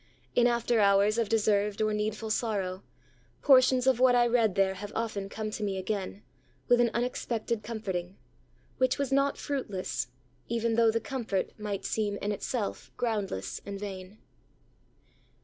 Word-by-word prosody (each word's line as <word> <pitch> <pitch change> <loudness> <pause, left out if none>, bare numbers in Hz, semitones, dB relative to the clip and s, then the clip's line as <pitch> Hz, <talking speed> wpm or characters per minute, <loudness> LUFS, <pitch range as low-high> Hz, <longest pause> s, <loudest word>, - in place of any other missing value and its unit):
In 240 0 +4
after 235 -1 +1
hours 200 +2 +4
of 225 -3 0
deserved 210 -2 +2
or 215 0 +1
needful 215 +1 -2
sorrow, 200 -5 -1 0.6
portions 255 -2 +5
of 260 -2 +3
what 255 -1 +5
I 240 0 +5
read 230 -5 +2
there 195 -1 +3
have 205 +2 -7
often 210 -4 -2
come 215 +1 -4
to 215 - -5
me 195 -2 -1
again, 195 +1 -4 0.4
with 245 0 +5
an 240 - +3
unexpected 235 -2 -2
comforting; 195 -5 -4 0.6
which 255 0 +2
was 280 -2 -2
not 275 +1 +2
fruitless, 230 -10 -3 0.4
even 230 0 0
though 230 0 +4
the 225 +1 +1
comfort 230 -6 -2
might 205 -2 -4
seem 205 -2 -1
in 205 - -2
itself 210 +1 -3
groundless 210 - -2
and 200 -1 -6
vain. 195 0 -7
215 Hz, 150 wpm, -29 LUFS, 200-235 Hz, 0.6 s, portions